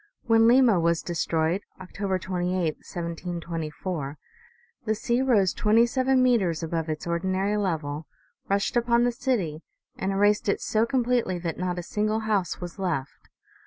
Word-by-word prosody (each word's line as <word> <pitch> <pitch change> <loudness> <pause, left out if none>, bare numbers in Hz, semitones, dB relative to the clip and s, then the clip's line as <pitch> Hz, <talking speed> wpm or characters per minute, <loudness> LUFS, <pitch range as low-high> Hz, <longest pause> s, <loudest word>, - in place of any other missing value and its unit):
When 225 -1 +4
Ivima 240 -7 +5
was 170 0 +1
destroyed, 165 +1 0 0.2
October 190 +1 -3
28, 180 -2 -1
1724, 170 -3 -5 0.7
the 220 -2 0
sea 235 +3 0
rose 215 -8 +3
twenty 225 +2 +4
seven 260 +1 +2
meters 190 -10 +2
above 165 0 -2
its 155 -1 -4
ordinary 190 +4 0
level, 160 -6 -2 0.4
rushed 200 +3 0
upon 235 0 +3
the 245 - +2
city 195 - -1 0.3
and 190 - -2
erased 205 +1 +2
it - - +1
so 220 +1 +1
completely 245 -7 +1
that 170 -1 -4
not 180 -1 -2
a 175 - -3
single 215 +4 -1
house 205 -6 -1
was 175 +2 -8
left. 165 -8 -3
190 Hz, 145 wpm, -26 LUFS, 170-225 Hz, 0.7 s, Ivima